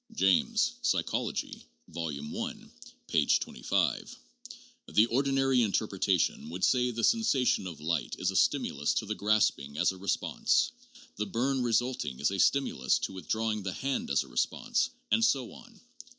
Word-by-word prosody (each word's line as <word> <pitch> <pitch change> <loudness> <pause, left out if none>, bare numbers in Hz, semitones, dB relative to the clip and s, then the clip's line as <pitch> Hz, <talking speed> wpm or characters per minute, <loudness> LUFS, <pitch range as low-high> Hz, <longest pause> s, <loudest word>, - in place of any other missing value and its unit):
(James, 95 -1 +3
Psychology, - - -1 0.2
Vol. 85 -1 -4
I, 75 +1 -5 0.5
p. - - +2
25.) - - 0 0.7
The 105 - +4
ordinary 135 +1 +2
in 110 -4 +1
terpretation 95 -6 0
would 90 +3 -6
say 125 -1 +3
the 115 -1 -4
sensation 135 - +2
of 80 -5 -8
light 80 +3 -2
is - - 0
a - - -8
stimulus 70 +1 +1
to - - -1
the 105 - -2
grasping 100 -10 +1
as - - +3
a 95 - -10
response, 90 -9 +1 0.5
the 105 0 -2
burn 130 +6 0
resulting 120 - -1
is 75 - +1
a 100 - -3
stimulus 110 - +2
to - - -4
with 95 - -9
drawing 110 -1 -1
the 95 -1 -4
hand 140 - -2
as - - +2
response 265 - -1 0.2
and 225 - +3
so 135 - +1
on. 235 -2 -15
110 Hz, 150 wpm, -29 LUFS, 90-130 Hz, 0.7 s, The